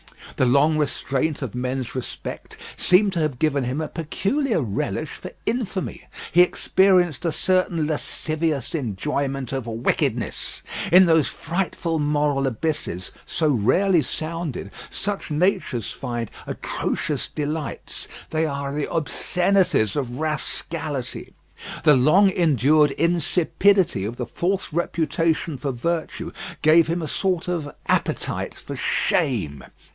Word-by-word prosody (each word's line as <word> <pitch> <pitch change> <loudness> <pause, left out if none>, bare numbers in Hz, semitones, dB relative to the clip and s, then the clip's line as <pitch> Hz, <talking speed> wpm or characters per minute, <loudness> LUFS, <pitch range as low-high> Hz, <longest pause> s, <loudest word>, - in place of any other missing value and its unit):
The 130 - +3
long 150 +5 +4
restraint 145 0 -1
of 120 - -5
men's 125 0 -3
respect 130 -2 -6 0.2
seemed 195 +2 +4
to 170 - -1
have 150 -5 0
given 140 -2 +1
him 130 +4 -2
a 155 - -2
peculiar 200 - -1
relish 110 -9 -2
for - - -8 0.2
infamy. 225 -6 -3 0.2
He 175 - +6
experienced 180 -3 +3
a 165 - +2
certain 180 -1 +1
lascivious 155 -1 -1
enjoyment 135 - -2
of 135 -3 -3
wickedness. 115 +1 -1 0.3
In 185 +2 +8
those 160 -4 +4
frightful 170 -1 -2
moral 145 -2 +1
abysses 130 - -3 0.2
so 155 -2 +1
rarely 165 - +3
sounded, 155 - -4 0.2
such 200 -2 -3
natures 155 - 0
find 120 -2 -4 0.2
atrocious - - -2
delights 150 0 -3 0.2
they 160 0 +1
are 140 -1 -3
the 150 0 -2
obscenities 175 - +2
of 125 -4 -2
rascality. 155 -3 -3 0.5
The 150 -2 +7
long 175 +10 +5
endured 150 - +4
insipidity 175 - +2
of 115 +4 -5
the 125 - -2
false 180 - -2
reputation 165 -2 0
for 140 +1 -2
virtue 160 +7 -3 0.3
gave 155 +1 +6
him 170 +1 -1
a - - -3
sort 180 +1 -1
of 165 -5 -2 0.2
appetite - - -1
for - - -8
shame. 75 - 0
155 Hz, 120 wpm, -23 LUFS, 135-170 Hz, 0.5 s, In